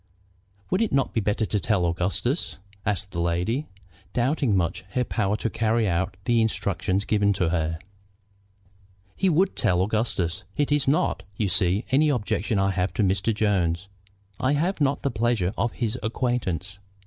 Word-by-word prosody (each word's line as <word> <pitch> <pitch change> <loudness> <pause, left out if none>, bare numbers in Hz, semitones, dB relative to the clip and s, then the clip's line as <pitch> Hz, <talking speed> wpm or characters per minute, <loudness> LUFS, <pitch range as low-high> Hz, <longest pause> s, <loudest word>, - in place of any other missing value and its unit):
"Would 185 +4 +2
it 225 - +1
not 135 -1 +1
be 115 - +1
better 105 +2 0
to 105 - -1
tell 100 -4 +1
Augustus?" 95 - -1 0.3
asked 100 -2 -1
the 85 - -2
lady, 90 - 0 0.5
doubting 125 -3 +2
much 85 0 -1
her 125 - +2
power 105 -3 0
to 115 - -2
carry 115 0 +1
out 95 +1 -1
the 120 -1 +3
instructions 100 -2 0
given 100 -1 +2
to 90 -4 0
her. 80 -1 0 1.4
"He 190 - +2
would 185 +4 +2
tell 90 -1 +2
Augustus. 100 -4 -1
It 145 0 +1
is 145 -2 +2
not, 140 +3 +2 0.2
you 105 -3 0
see, 90 +3 +2
any 150 +3 +4
objection 110 - 0
I 95 0 +2
have 95 0 -1
to 110 - +2
Mr. 95 +3 +1
Jones. 95 -4 0 0.5
I 130 +2 +2
have 165 +4 0
not 140 0 +1
the 140 - +1
pleasure 115 -5 +1
of 120 +3 0
his 120 +1 -2
acquaintance. 100 - -2
105 Hz, 165 wpm, -25 LUFS, 95-125 Hz, 1.4 s, any